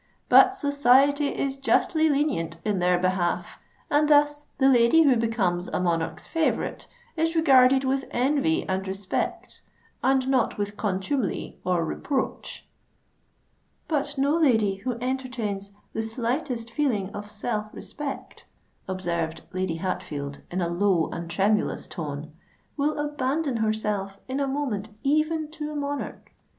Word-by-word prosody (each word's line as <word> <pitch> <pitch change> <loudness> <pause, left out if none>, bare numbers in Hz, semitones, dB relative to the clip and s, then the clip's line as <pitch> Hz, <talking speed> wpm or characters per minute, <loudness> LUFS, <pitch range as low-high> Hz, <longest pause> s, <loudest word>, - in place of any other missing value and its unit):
But 385 0 +7
society 285 -2 +4
is 275 -1 -2
justly 315 +3 +2
lenient 275 - 0
in 205 -3 0
their 180 0 +3
behalf; 185 -1 -1 0.3
and 295 +1 +2
thus 295 0 +3
the 270 - +4
lady 250 +5 +6
who 275 -4 +5
becomes 205 -6 0
a - - -2
monarch's 165 -3 -1
favourite, 325 -2 -1 0.3
is 325 0 0
regarded 265 -4 +5
with 270 0 0
envy 295 +6 +1
and 190 +1 -2
respect, 195 0 -3 0.4
and 265 0 +3
not 265 -2 +1
with 205 0 -3
contumely 205 +3 -2
or 180 -2 +1
reproach." 265 - -3 1.2
"But 290 -2 -1
no 280 +3 +2
lady 220 -11 +3
who 250 +6 -3
entertains 245 -6 -3 0.2
the 220 - -1
slightest 235 +1 -2
feeling 230 -8 0
of 205 0 -7
self 215 0 -3
respect," 290 -2 -7 0.4
observed 170 -3 -2
Lady 185 -2 -1
Hatfield, 145 -5 -4
in 185 +1 -2
a 170 - +1
low 175 -1 +1
and 170 0 -5
tremulous 200 +4 +1
tone, 150 -2 -6 0.4
"will 300 +1 0
abandon 295 -1 -1
herself 210 -3 -1
in 265 +2 -2
a 280 - 0
moment 260 -7 -2
even 310 +2 +1
to 305 -1 -5
a - - -6
monarch. 285 -1 -4
240 Hz, 135 wpm, -26 LUFS, 190-285 Hz, 1.2 s, But